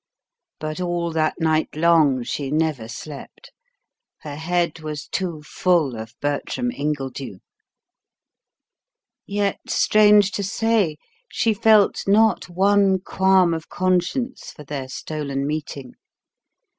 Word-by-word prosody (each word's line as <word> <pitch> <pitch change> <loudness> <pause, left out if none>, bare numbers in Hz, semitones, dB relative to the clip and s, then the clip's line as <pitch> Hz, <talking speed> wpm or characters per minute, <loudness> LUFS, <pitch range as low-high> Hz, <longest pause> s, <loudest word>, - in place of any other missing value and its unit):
But 155 +2 -4
all 175 -1 -1
that 160 +1 0
night 160 -2 0
long 155 -5 +3
she 135 +3 -4
never 150 -6 -1
slept. 140 +5 -10 0.7
Her 150 - -7
head 170 +1 -1
was 150 -1 -6
too 170 -5 -4
full 160 -5 +1
of 110 +1 -8
Bertram 145 - -2
Ingledew. 140 - -4 1.9
Yet, 200 -1 -1
strange 210 -1 +4
to 200 - -3
say, 200 -5 0 0.3
she 225 - +1
felt 215 -2 +3
not 215 -1 +3
one 195 +1 +3
qualm 190 -2 +3
of 160 -1 -6
conscience 185 +8 -1
for 150 - -11
their 135 -2 -5
stolen 140 -1 -4
meeting. 145 -3 -5
165 Hz, 110 wpm, -22 LUFS, 150-195 Hz, 1.9 s, strange